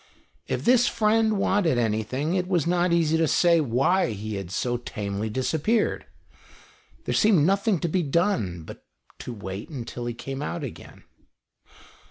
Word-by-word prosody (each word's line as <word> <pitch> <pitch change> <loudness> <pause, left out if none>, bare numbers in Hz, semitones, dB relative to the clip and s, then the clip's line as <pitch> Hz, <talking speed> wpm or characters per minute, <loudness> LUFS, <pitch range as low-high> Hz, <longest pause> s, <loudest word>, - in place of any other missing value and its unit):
If - - -3
this 245 0 +5
friend 220 0 +2
wanted 190 -8 +2
anything, 120 +7 -1
it 185 -1 0
was 175 -5 +1
not 175 +1 +1
easy 165 -2 +2
to 160 0 +2
say 170 +1 +4
why 135 +3 +1
he 105 +1 -6
had 100 -3 -5
so 120 +6 -1
tamely 105 -2 -4
disappeared. 145 - 0 1.0
There - - -1
seemed 195 -9 +4
nothing 200 +2 +2
to - - 0
be 180 +3 0
done 145 - 0
but - - -11 0.4
to - - -6
wait 100 -2 -7
until 120 -4 -6
he 120 - -4
came 135 +3 -6
out 155 +2 -4
again. 130 - -9
150 Hz, 155 wpm, -25 LUFS, 115-185 Hz, 1.0 s, this